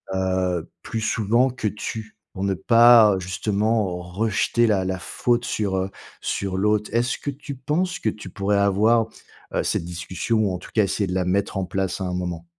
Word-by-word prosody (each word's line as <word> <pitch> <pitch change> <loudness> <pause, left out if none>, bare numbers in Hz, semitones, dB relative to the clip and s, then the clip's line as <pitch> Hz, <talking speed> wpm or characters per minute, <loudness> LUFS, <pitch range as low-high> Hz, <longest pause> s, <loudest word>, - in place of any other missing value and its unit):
heu, 95 -2 0
plus 115 - -3
souvent 115 +4 +2
que 125 -3 -3
«tu», 110 +1 -6 0.2
pour 95 - -4
ne 100 -1 +1
pas 115 +1 +6
justement, 100 +1 0
rejeter 105 +5 +1
la 100 -4 +2
la 95 0 -2
faute 120 +5 0
sur, 100 -6 -1
heu, 95 +1 -2 0.3
sur 95 -1 -2
l'autre. 105 +1 +1
Est-ce 120 +2 +1
que - - -5
tu 140 +1 -8
penses 165 +8 -1
que 110 - 0
tu 105 -3 -8
pourrais 100 +2 0
avoir, 105 +3 +3 0.5
heu, - - +1
cette - - -1
discussion 90 +6 -2
ou 100 -4 +1
en - - -2
tout - - -13
cas, 110 - +4
essayer 100 +1 -1
de 90 - -3
la 95 - +1
mettre 100 +2 0
en 95 - 0
place 95 0 -2
à - - -1
un 90 - -3
moment? 90 -2 -4
100 Hz, 195 wpm, -23 LUFS, 95-115 Hz, 0.5 s, pas